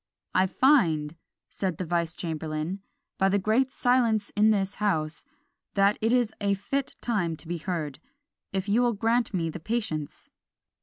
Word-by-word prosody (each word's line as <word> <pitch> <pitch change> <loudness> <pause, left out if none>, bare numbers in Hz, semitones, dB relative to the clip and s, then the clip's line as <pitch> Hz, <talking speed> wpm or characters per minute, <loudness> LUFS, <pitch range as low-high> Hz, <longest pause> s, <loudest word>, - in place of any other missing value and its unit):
"I 185 +1 +4
find," 170 - +3 0.4
said 185 -5 -2
the 185 - -3
vice 170 0 -1
chamberlain, 160 +2 -3 0.4
"by 195 0 +4
the 200 - +3
great 220 +7 +2
silence 240 -5 +2
in 210 +1 +4
this 195 -2 +1
house, 155 -7 0 0.5
that 200 +1 +3
it 225 +1 +2
is 240 -3 +2
a 200 -1 +2
fit 255 +8 -3
time 190 -9 0
to 160 - -10
be 170 0 -3
heard, 155 -5 -3 0.5
if 190 +1 -2
you 215 +4 +3
will 240 -1 +3
grant 230 +3 +1
me 165 -5 -1
the 175 - -7
patience." 200 -6 -4
195 Hz, 160 wpm, -27 LUFS, 165-225 Hz, 0.5 s, I